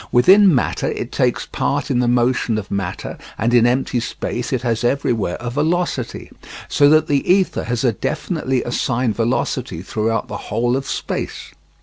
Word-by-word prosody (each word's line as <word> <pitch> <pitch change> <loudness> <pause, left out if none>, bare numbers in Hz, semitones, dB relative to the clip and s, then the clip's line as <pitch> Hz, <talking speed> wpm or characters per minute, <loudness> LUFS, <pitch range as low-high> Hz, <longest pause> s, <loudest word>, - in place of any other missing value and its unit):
Within 185 +7 +6
matter 125 - 0
it - - -4
takes - - 0
part - - -2
in 120 - +2
the 125 - +2
motion 120 -2 +1
of 105 -2 -6
matter 100 -3 -4 0.2
and 115 +2 0
in 120 -1 +5
empty 125 0 0
space 120 +1 -4
it 130 -2 -1
has 115 -2 -1
everywhere 120 -7 0
a 120 0 -4
velocity; 165 +6 -2 0.4
so 145 0 +4
that 155 +1 +5
the 140 +3 +1
ether 190 0 +2
has 120 0 -2
a 125 - +3
definitely 150 - -2
assigned 120 -1 -1
velocity 115 -5 -1
throughout 110 +2 -1
the 105 - -5
whole 120 +3 +1
of 135 +1 -3
space. - - -4
120 Hz, 165 wpm, -19 LUFS, 115-140 Hz, 0.4 s, Within